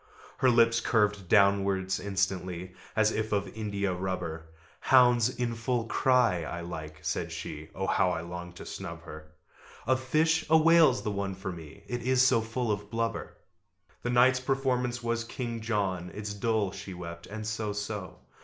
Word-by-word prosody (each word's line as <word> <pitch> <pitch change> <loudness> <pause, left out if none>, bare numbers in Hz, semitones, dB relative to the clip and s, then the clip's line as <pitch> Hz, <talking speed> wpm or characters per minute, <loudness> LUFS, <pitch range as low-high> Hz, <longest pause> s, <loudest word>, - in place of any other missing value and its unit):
Her 130 - +5
lips 115 -1 +4
curved 105 -5 +1
downwards 100 -2 +3
instantly, 95 -2 -2 0.2
As 110 0 +3
if 110 0 -2
of 100 -1 0
india 100 -3 -2
rubber. 90 -3 -4 0.3
"Hounds 125 -2 +5
in 120 -2 -2
full 115 0 -1
cry 120 -6 +3
I 85 +2 -5
like," 80 -2 -7
said - - -2
she: 80 +1 -7
(Oh 95 - -2
how 90 - +2
I 85 -2 -2
longed 90 +1 -7
to - - -9
snub 85 0 -7
her!) 80 -2 -10 0.6
"Of 130 +2 +2
fish, 160 +5 +2
a 160 - +7
whale's 160 -4 +5
the 105 - -1
one 100 -1 -3
for 95 0 -5
me, 85 +2 -11
It 120 +3 -4
is 130 +1 +3
so 130 -3 +4
full 115 +1 -2
of 105 0 -3
blubber!" 115 0 -3 0.6
The 120 - -2
night's 125 +1 +5
performance 125 -2 -1
was 115 0 -1
"King 115 -1 -5
John." 100 -6 -1
"It's 105 0 -4
dull," 105 -1 0
she 95 -1 -8
wept, 85 -1 -8
"and 105 +1 -6
so 110 0 -2
so!" 105 -2 -5
105 Hz, 170 wpm, -29 LUFS, 95-120 Hz, 0.6 s, a